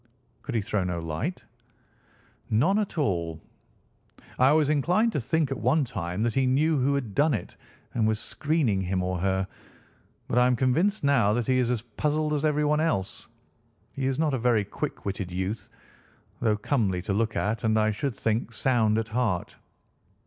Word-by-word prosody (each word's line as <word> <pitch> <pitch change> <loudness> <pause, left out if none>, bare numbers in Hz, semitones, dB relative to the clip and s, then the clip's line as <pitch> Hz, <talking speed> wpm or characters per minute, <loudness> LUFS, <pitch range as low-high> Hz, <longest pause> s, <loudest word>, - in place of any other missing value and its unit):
"Could 135 - -5
he 110 - +2
throw 105 -2 -1
no 90 -1 -2
light?" 85 - -4 1.0
"None 150 - +3
at 205 -4 -3
all. 85 - -1 1.0
I 130 +2 +6
was 155 -1 +4
inclined 180 - +2
to - - 0
think 155 +2 0
at 135 - -2
one 140 +4 +2
time 90 -2 -3
that 115 -1 0
he 135 -1 +2
knew 150 +5 +2
who 140 +2 +2
had 125 -7 -3
done 145 +2 +3
it - - -7 0.4
and 110 -2 +1
was 110 -1 0
screening 140 -12 0
him 95 0 -1
or 90 -1 -2
her, 95 +1 0 0.8
but 125 - +2
I 125 - +5
am 125 - +3
convinced 160 - +1
now 125 -8 +3
that 120 0 0
he 130 +2 +2
is 125 -2 +1
as 120 -3 -1
puzzled 150 +6 -1
as 150 -1 -1
everyone 150 0 +2
else. 155 -13 -1 0.7
He 135 -1 -2
is 135 -1 -1
not 155 -2 +1
a 130 - 0
very 115 -3 +2
quick - - -5
witted 95 -2 -3
youth, 95 +5 -3 0.7
though 110 -3 +1
comely 105 -7 0
to 95 - -1
look 110 +2 0
at 105 +1 -1
and, 110 -1 +2
I 110 0 +3
should 130 +3 -3
think, 115 +1 -1
sound 110 -4 +2
at 115 0 -2
heart." 110 -6 -1
120 Hz, 185 wpm, -27 LUFS, 105-145 Hz, 1.0 s, I